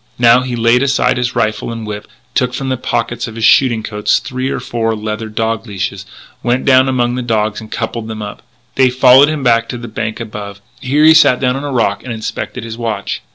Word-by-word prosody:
Now 120 +1 +5
he 130 -1 -3
laid 115 +1 +3
aside 140 -1 +1
his 125 -1 -2
rifle 110 +2 -1
and 115 -1 -6
whip, 105 -1 -6 0.3
took 125 -1 0
from 135 0 -3
the 130 - 0
pocket 120 -1 -2
of 115 - -9
his 115 -1 0
shooting 120 -5 +4
coat 105 -1 -7
three 130 0 0
or - - -2
four 115 -1 -2
leather 110 +1 -4
dog 115 +1 -2
leashes, 100 -3 -4 0.3
went 125 +2 0
down 130 0 +5
among 120 -2 0
the 125 - -2
dogs 110 -3 -1
and 110 - -12
coupled 115 0 -4
them 110 -1 -6
up. 105 - -8 0.3
They 130 -1 +4
followed 130 +3 +6
him 155 -3 -3
back 115 -2 +2
to 125 - -4
the 120 0 -8
bank 110 0 -4
above. 105 -3 -7 0.2
Here 145 +4 +1
he 160 - +8
sat 155 -6 +5
down 125 -1 +1
on 135 - -4
a 145 - -4
rock 120 -3 0
and 130 - -6
inspected 110 -1 -5
his 115 0 -7
watch. 110 -4 -3
120 Hz, 225 wpm, -15 LUFS, 110-130 Hz, 0.3 s, he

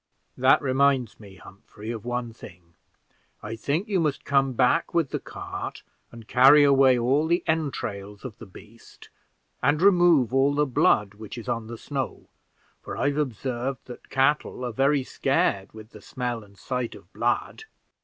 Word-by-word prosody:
"That 130 +1 +4
reminds 135 -3 +1
me, 100 -3 -13
Humphrey, 105 +4 -11
of 115 -1 -7
one 120 -1 -3
thing; 85 -6 -14 0.7
I 105 +2 -5
think 150 - -2
you 200 -3 0
must 150 -4 -1
come 135 -1 +2
back 125 +8 +1
with 165 -5 +1
the - - -2
cart - - -7 0.3
and 115 -2 -13
carry 135 +4 +7
away 135 -2 +5
all 135 +6 +1
the 170 +2 +1
entrails 110 -10 -3
of 115 -5 -8
the 115 - -10
beast, 110 +4 -16 0.5
and 150 - +2
remove 175 - +4
all 135 +2 +3
the 150 +1 +2
blood 105 -6 +2
which 110 +3 -10
is 115 - -8
on 115 -2 -3
the 115 0 -7
snow, 135 0 -5 0.5
for - - -7
I've 145 0 0
observed 130 -1 -3
that 125 - -12
cattle 135 -1 0
are 120 - -4
very 135 +2 +2
scared 95 -5 0
with 110 +1 -13
the - - -13
smell 120 -3 -4
and 100 -1 -20
sight 125 0 -4
of - - -17
blood. 440 - -2
125 Hz, 165 wpm, -25 LUFS, 115-140 Hz, 0.7 s, carry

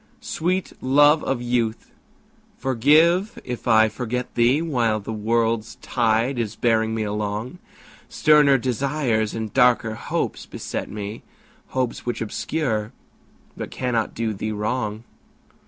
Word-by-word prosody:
Sweet 185 +3 -2
love 145 +3 +5
of 130 -2 -1
youth, 120 -2 -1 0.7
forgive 155 - +3
if 125 0 -6
I 110 -1 +6
forget 125 +2 -4
thee 120 +4 +3
While 120 -9 0
the 105 +2 -6
world's 115 +1 0
tide 120 +2 0
is 110 -3 -2
bearing 110 -1 +1
me 110 - -1
along; 105 - -3 0.5
Sterner 150 -3 +5
desires 125 -3 -1
and 110 -2 -4
darker 125 -3 +3
hopes - - -3
beset - - -5
me, 105 +1 -6 0.5
Hopes 130 -2 -2
which 120 -2 -3
obscure 110 -1 -2 0.6
but - - -6
cannot 120 -3 -2
do 115 -1 -1
thee 110 +2 -4
wrong. 110 +1 -2
120 Hz, 120 wpm, -23 LUFS, 110-135 Hz, 0.7 s, I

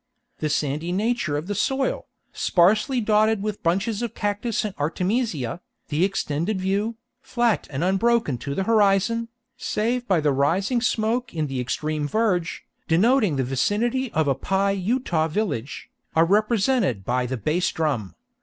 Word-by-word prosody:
The 155 - -1
sandy 150 +3 -1
nature 200 -6 0
of 150 - -4
the 205 - -3
soil, 265 +6 -1 0.3
sparsely 215 +8 +2
dotted 215 -1 +2
with 210 -1 -3
bunches 195 +6 0
of 235 -3 -4
cactus 205 +2 -1
and 210 - -3
artemisia, 175 - -1 0.3
the 155 +3 +1
extended 190 0 -1
view, 200 +4 -1 0.3
flat 240 -3 0
and 140 +2 -3
unbroken 195 - +1
to 140 +2 -4
the 195 - 0
horizon, 220 +2 +2 0.3
save 240 +3 -1
by 185 -4 +3
the 150 -1 +2
rising 190 - +1
smoke 230 -1 0
in 155 -1 0
the 135 -3 -4
extreme 150 +4 -2
verge, 185 -3 0 0.2
denoting 205 - +3
the 135 - 0
vicinity 220 - 0
of 160 -2 +1
a 140 - +3
Pi 195 +8 0
Utah 195 -4 0
village, 155 - -3 0.2
are 165 +1 +5
represented 210 - +1
by 125 0 0
the 130 +1 -3
bass 155 - 0
drum. 135 - -2
195 Hz, 150 wpm, -24 LUFS, 155-225 Hz, 0.3 s, are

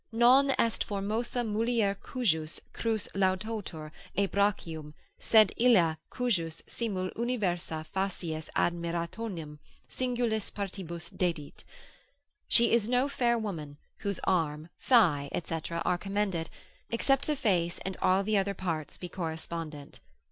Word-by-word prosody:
Non 250 +5 +6
est 230 -1 +2
formosa 220 +5 -2
mulier 225 -1 +1
cujus 160 - 0
crus 225 -3 -1
laudatur 190 -4 -1 0.3
et 200 -1 +2
brachium, 165 -7 0 0.2
sed 215 -3 +6
illa 195 -10 +5
cujus 175 -11 -1
simul 190 -6 -3
universa 185 -9 -1
facies 175 -5 -2
admirationem 170 -1 -2 0.3
singulis 240 -4 -1
partibus 175 -4 -5
dedit; 165 -5 -2 0.8
she 235 0 +4
is 230 -1 +3
no 250 +2 +3
fair 240 -4 +2
woman, 160 -10 -5 0.2
whose 200 -2 -3
arm, 160 -3 0
thigh, 165 - +4
&c. 165 0 -2
are 170 +1 0
commended, 195 -4 -1 0.4
except 270 +4 +1
the 305 - +1
face 180 -9 +1
and 190 0 -2
all 190 +2 +4
the 210 0 +2
other 200 +1 -1
parts 165 -5 -3
be 180 - -6
correspondent. 160 -4 -5
190 Hz, 120 wpm, -30 LUFS, 165-225 Hz, 0.8 s, Non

